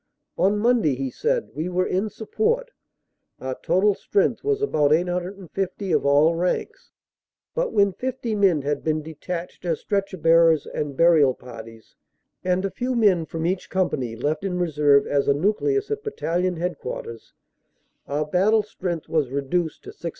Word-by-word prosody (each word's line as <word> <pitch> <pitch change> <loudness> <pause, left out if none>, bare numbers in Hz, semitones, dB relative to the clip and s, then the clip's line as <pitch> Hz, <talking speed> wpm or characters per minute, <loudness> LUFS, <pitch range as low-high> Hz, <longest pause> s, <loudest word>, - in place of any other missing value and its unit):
"On 200 +3 +2
Monday," 220 - +2
he 135 0 -3
said, 485 +1 -1
"we 160 +4 -3
were 180 +1 +1
in 195 +4 -1
support. 450 - -1 0.7
Our 130 0 -3
total 200 +3 +3
strength 200 +4 0
was 420 -1 +1
about 150 - +2
850 180 +3 -2
of - - +2
all 145 +4 +5
ranks, 175 +2 -2 0.6
but - - -1
when 200 -2 +3
fifty 250 -2 -3
men 190 -8 +3
had 145 0 -2
been 155 -1 0
detached 170 +4 -6
as 170 -3 -1
stretcher 195 -2 -2
bearers 165 -2 +4
and 145 -3 -4
burial 160 -6 +5
parties, 115 -2 -12 0.5
and 185 +1 +1
a 195 - -2
few 255 +1 -2
men 190 -8 +3
from 160 +2 -4
each 180 +2 -2
company 135 -11 -1
left 150 +8 -2
in 185 -2 -2
reserve 150 -5 +3
as 140 -1 0
a 140 - +4
nucleus 400 - 0
at 430 0 -2
Battalion 180 - -1
Headquarters, 165 -9 -5 0.7
our 150 +2 -1
battle 200 +7 +3
strength 180 -5 -5
was 155 -5 0
reduced 140 +5 -2
to - - -9
675. 170 - -6
180 Hz, 155 wpm, -23 LUFS, 150-205 Hz, 0.7 s, all